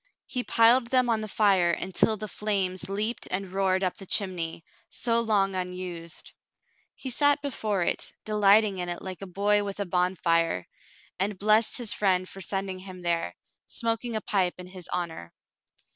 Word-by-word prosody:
He 250 -2 -3
piled 235 +2 +5
them 255 0 +3
on 220 -1 +1
the 215 - -4
fire 195 -4 +3
until 190 +5 +1
the 215 +1 -5
flames 195 -4 -1
leaped 210 +4 -2
and 185 0 -3
roared 190 -1 +1
up 185 - -1
the 195 - -9
chimney, 170 -5 -1 0.2
so 230 -1 +2
long 205 -4 +2
unused. 180 -2 -4 0.6
He 260 - -5
sat 290 +3 +4
before 215 -9 -1
it, - - -1
delighting 210 -1 +4
in 175 0 -3
it 175 - -5
like 190 -1 -6
a 195 - -6
boy 205 +3 +2
with 200 0 -5
a 200 - 0
bonfire, 170 - +1 0.5
and 195 +1 -1
blessed 215 +3 +3
his 240 -4 -1
friend 185 -2 +1
for 195 - -8
sending 190 0 -3
him 185 -1 -10
there, 165 - -1 0.3
smoking 230 0 -2
a 215 - -1
pipe 185 -3 0
in 180 - -8
his 180 -1 -9
honor. 165 - -4
195 Hz, 170 wpm, -27 LUFS, 180-215 Hz, 0.6 s, piled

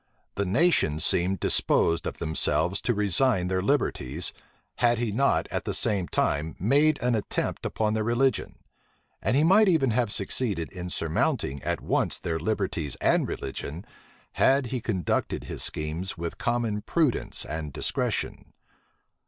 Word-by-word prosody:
The 100 -1 -2
nation 110 - +2
seemed 90 +4 +1
disposed 85 +1 +2
of - - -5
themselves 80 +2 0
to 120 - +1
resign 100 -1 +2
their 95 0 0
liberties, 90 - -1 0.4
had 120 -1 +3
he 115 -2 -1
not, 135 +7 +2
at - - -2
the - - -2
same 95 -4 +1
time, 75 +3 -1
made 145 - +3
an 125 0 +2
attempt 110 -3 -2
upon 110 -1 -1
their 110 0 0
religion: 120 +4 +1 0.7
and - - +1
he 150 - +4
might 200 +6 +5
even 155 -9 +3
have 115 -2 0
succeeded 100 -4 0
in 90 -1 -6
surmounting 75 -4 -1
at - - -2
once - - 0
their 80 -1 -3
liberties 90 - -2
and - - +2
religion, 75 +6 -6 0.5
had 135 0 +3
he 125 - -2
conducted 95 -8 -1
his - - -5
schemes 80 +5 -2
with 85 0 -5
common 115 -3 -1
prudence 155 +1 0
and 80 -2 -5
discretion. - - -2
100 Hz, 145 wpm, -26 LUFS, 85-125 Hz, 0.7 s, might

